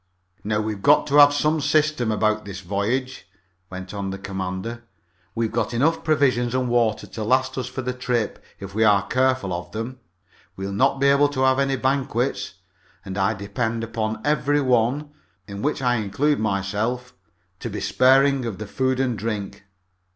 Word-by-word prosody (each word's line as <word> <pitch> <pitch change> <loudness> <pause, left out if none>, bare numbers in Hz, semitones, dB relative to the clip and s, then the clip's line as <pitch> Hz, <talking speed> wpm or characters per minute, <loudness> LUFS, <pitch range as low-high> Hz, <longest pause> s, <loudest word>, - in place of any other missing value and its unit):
"Now 105 0 0
we've 105 -2 -4
got 145 +5 +5
to 145 - +3
have 145 0 +9
some 150 +2 +1
system 155 -6 +1
about 110 0 +1
this 100 -1 -8
voyage," 105 +5 -2 0.4
went 95 0 -8
on 100 -1 -3
the 95 - -4
commander. 95 +4 -5 0.5
"We've 115 -1 -1
got 120 +1 -1
enough 160 +7 +1
provisions 130 -6 +2
and 130 -1 0
water 120 -3 +1
to 110 - -6
last 130 +4 +1
us 130 -2 -3
for 130 +1 -5
the 125 +1 -2
trip 125 -3 -2 0.2
if 100 0 -8
we 110 +2 +2
are 100 -2 +4
careful 130 -7 +1
of 85 0 -6
them. 115 +4 -5 0.6
We'll 95 +1 -5
not 135 +7 +2
be 140 - +2
able 140 +1 +5
to 135 -2 -3
have 130 0 +3
any 135 0 +1
banquets, 130 -6 -1 0.5
and 95 -1 -6
I 100 +2 +1
depend 110 +3 -3
upon 110 -1 -3
every 145 0 +2
one 130 +3 +1 0.4
in 100 0 -7
which 145 -1 -1
I 125 -1 +2
include 115 +9 0
myself 110 +5 -2 0.5
to - - -5
be - - -5
sparing 135 +1 +3
of 110 -5 -4
the 110 - -6
food 130 +4 -1
and 130 -3 0
drink. 100 -2 -5
120 Hz, 175 wpm, -23 LUFS, 105-130 Hz, 0.6 s, have